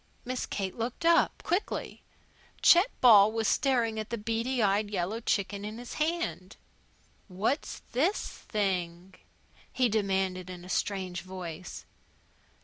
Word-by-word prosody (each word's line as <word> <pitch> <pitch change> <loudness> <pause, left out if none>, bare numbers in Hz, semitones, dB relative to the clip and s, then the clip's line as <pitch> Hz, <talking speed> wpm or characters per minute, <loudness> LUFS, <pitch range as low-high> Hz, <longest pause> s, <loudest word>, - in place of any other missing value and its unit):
Miss 255 0 -3
Kate 195 -2 -3
looked 235 +7 -4
up, 335 0 +3
quickly. 360 +4 -2 0.6
Chet 355 +7 +7
Ball 215 -4 +8
was 225 0 -1
staring 235 -5 +1
at 215 - -5
the 235 - -2
beady 230 +4 -2
eyed 205 -1 +2
yellow 200 +2 -2
chicken 200 -3 -1
in 215 +2 -6
his 245 0 -8
hand. 315 - -2 0.7
"What's 210 - -2
this 320 - +1
thing?" 185 -3 -3 0.6
he 250 -2 +2
demanded 190 -3 -1
in 180 -1 -9
a - - -11
strange 185 -2 -2
voice. 180 -2 -8
210 Hz, 130 wpm, -29 LUFS, 190-240 Hz, 0.7 s, Ball